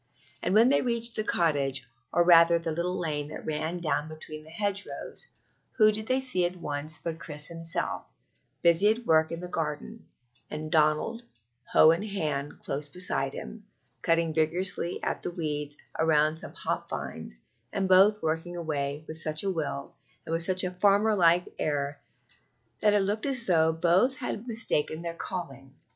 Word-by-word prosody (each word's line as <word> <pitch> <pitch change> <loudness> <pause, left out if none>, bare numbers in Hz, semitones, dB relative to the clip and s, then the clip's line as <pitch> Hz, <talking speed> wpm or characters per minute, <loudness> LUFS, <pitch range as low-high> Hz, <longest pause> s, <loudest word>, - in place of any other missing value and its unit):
And 190 - 0
when 230 +3 +6
they 280 - +3
reached 235 -1 -2
the 215 - 0
cottage, 140 - 0 0.2
or 175 - +4
rather 170 -1 +7
the 165 -1 -3
little 175 +3 -2
lane 150 -3 -2
that 150 - -8
runs 160 +3 -3
down 150 -1 0
between 155 -1 -8
the 155 - -15
hedgerows, 200 +3 -4 0.5
who 215 -2 +5
did 215 +1 -3
they 260 +1 +2
see 255 -9 +2
at 175 +1 -1
once 150 -2 -4
but 160 +2 -5
Chris 150 -2 -4
himself, 165 0 -2 0.6
busy 170 +5 +5
at 230 +2 0
work 160 -2 +3
in 165 +1 -5
the 180 - -5
garden, 165 +7 -4 0.4
and 155 0 -6
Donald, 155 +9 +2 0.4
hoe 155 - +6
in 165 +3 0
hand, 155 -9 -3
close 145 +2 -3
beside 145 -5 0
him, 215 -2 -9 0.3
cutting 165 -1 +1
vigorously 170 +3 0
at - - -2
the - - -3
weeds 150 -4 -3 0.2
round 155 0 +3
some - - -8
hop - - -3
vines, - - -6 0.3
and 195 -1 -1
both 195 +3 +5
working 165 +2 -2
away 150 -2 -3
with 155 - -4
such 155 +1 0
a 195 - 0
will 145 -5 -4 0.3
and 165 +1 -1
such 185 +2 +3
a 180 - -1
farmer 200 +4 +3
like 175 -1 +4
air 145 -1 -2 0.8
that 210 -1 +3
it 205 - +4
looked 210 +5 -1
as 255 -4 -1
though 160 -3 +4
both 175 +11 +3
had 245 -3 -5
mistaken 175 -8 -1
their 170 -1 -3
calling. 135 -7 -6
165 Hz, 170 wpm, -28 LUFS, 155-195 Hz, 0.8 s, rather